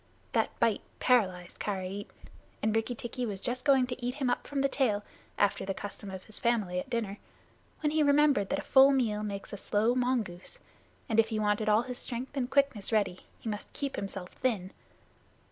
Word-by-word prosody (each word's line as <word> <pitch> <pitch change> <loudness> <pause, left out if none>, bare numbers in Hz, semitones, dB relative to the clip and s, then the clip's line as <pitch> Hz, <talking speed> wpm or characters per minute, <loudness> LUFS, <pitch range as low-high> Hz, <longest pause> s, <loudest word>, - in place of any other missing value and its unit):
That - - 0
bite - - +2 0.2
paralyzed 185 -8 +2
Karait, 195 0 -3 0.6
and 220 0 +2
Rikki 225 +2 0
tikki 240 +2 -4
was 205 -5 -3
just 245 +5 -1
going 270 -3 +5
to 250 0 -6
eat 250 +1 -1
him 265 -4 0
up - - -2
from 280 -1 -1
the 275 - +4
tail, 230 -7 +1 0.3
after 205 -1 +2
the 195 0 -3
custom 205 0 -7
of 190 -1 -7
his 215 - -6
family 210 -7 +1
at 220 - -6
dinner, 220 -4 -2 0.6
when 300 -1 +1
he 310 0 +2
remembered 285 -8 +4
that 285 - +1
a - - -4
full 270 +1 +7
meal 230 -6 +1
makes 200 -1 -5
a - - -4
slow 215 +4 +1
mongoose, 245 - -1 0.5
and 225 0 +2
if 225 - +5
he 220 - -1
wanted 210 0 +1
all 215 +2 +4
his 250 0 -6
strength 255 +3 -5
and 255 -3 -1
quickness 270 -7 +1
ready, 200 -5 +1 0.2
he - - -9
must 210 -1 -4
keep 280 -1 -3
himself 195 -2 -4
thin. 205 -7 -1
225 Hz, 195 wpm, -30 LUFS, 205-255 Hz, 0.6 s, full